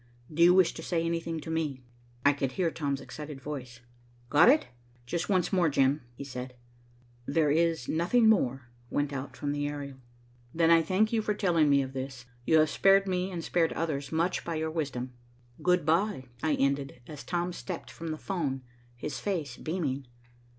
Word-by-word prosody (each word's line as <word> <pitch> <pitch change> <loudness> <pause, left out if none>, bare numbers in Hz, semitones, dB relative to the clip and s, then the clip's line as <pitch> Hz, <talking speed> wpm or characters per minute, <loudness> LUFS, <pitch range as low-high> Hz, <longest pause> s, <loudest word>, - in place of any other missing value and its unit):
"Do 165 - -1
you 175 +1 +7
wish 185 -3 +5
to - - -8
say 165 0 -1
anything 165 -1 -2
to 160 - -6
me?" 150 -5 -2 0.4
I 145 - +6
could 135 -2 -2
hear 170 0 0
Tom's 140 -4 -2
excited 150 -2 -8
voice. 130 -4 -7 0.5
"Got 160 +9 +7
it?" 300 +4 +5 0.4
"Just 170 +8 -3
once 185 -1 +1
more, 175 -3 +4
Jim," 140 +1 +2
he 140 - -7
said. 125 -2 -7 0.7
"There 150 0 +2
is 165 -4 +1
nothing 195 +9 +3
more," 135 - +2 0.2
went 145 0 -1
out 130 -1 -6
from 145 - -2
the 145 0 -1
aerial. 140 -2 -6 0.6
"Then 165 0 +4
I 165 0 +7
thank 200 +6 +1
you 225 - +2
for 210 -1 -1
telling 170 -7 +3
me 140 -1 +4
of 130 0 -7
this. 130 -2 -6 0.2
You 160 - +5
have 155 -1 +4
spared 195 0 +4
me 185 0 0
and 175 -3 -5
spared 165 -1 +1
others 150 -4 -2
much 170 +3 0
by 170 - -3
your 160 0 -2
wisdom. 130 -6 -3 0.5
Good 180 -3 +2
bye." 160 - +5 0.3
"Good 130 - -22
bye," 160 - 0
I - - +3
ended, 140 -1 0
as 150 0 -9
Tom 175 0 -2
stepped 180 -1 -6
from 165 - -8
the 155 -1 -3
'phone, 145 -8 -3 0.3
his 135 +3 -5
face 160 -11 -2
beaming. 140 -6 -3
155 Hz, 190 wpm, -29 LUFS, 140-170 Hz, 0.7 s, you